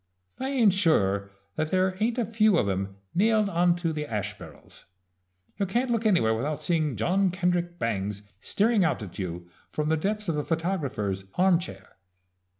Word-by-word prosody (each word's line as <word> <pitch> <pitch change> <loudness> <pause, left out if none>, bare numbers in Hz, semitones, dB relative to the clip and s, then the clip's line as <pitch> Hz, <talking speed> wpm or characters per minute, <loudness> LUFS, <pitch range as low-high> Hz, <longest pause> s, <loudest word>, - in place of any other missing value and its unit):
I 265 - -2
ain't 235 -8 +4
sure 100 - +2 0.3
that 155 0 0
there 185 +1 +1
ain't 230 +3 0
a 240 - +1
few 215 -3 +3
of 110 - +1
'em 95 0 -2 0.2
nailed 215 +2 +3
onto 175 -2 +1
the 150 -1 -4
ash 105 -2 -3
barrels. - - -13 0.7
You 200 - +1
can't 240 +6 0
look 230 -1 +1
anywhere 115 - +3
without 140 +6 -2
seeing 155 -6 0
John 185 - +2
Kendrick 175 -1 -1
Bangs 105 - -2 0.2
staring 215 -1 +2
out 155 -9 0
at 95 -2 -9
you 90 -2 -5 0.2
from 150 0 -1
the 160 - +2
depths 210 +5 -2
of 165 -3 0
a 150 - -1
photographer's 140 - -2
arm 185 -1 +4
chair. 95 - -10
170 Hz, 170 wpm, -27 LUFS, -, 0.7 s, ain't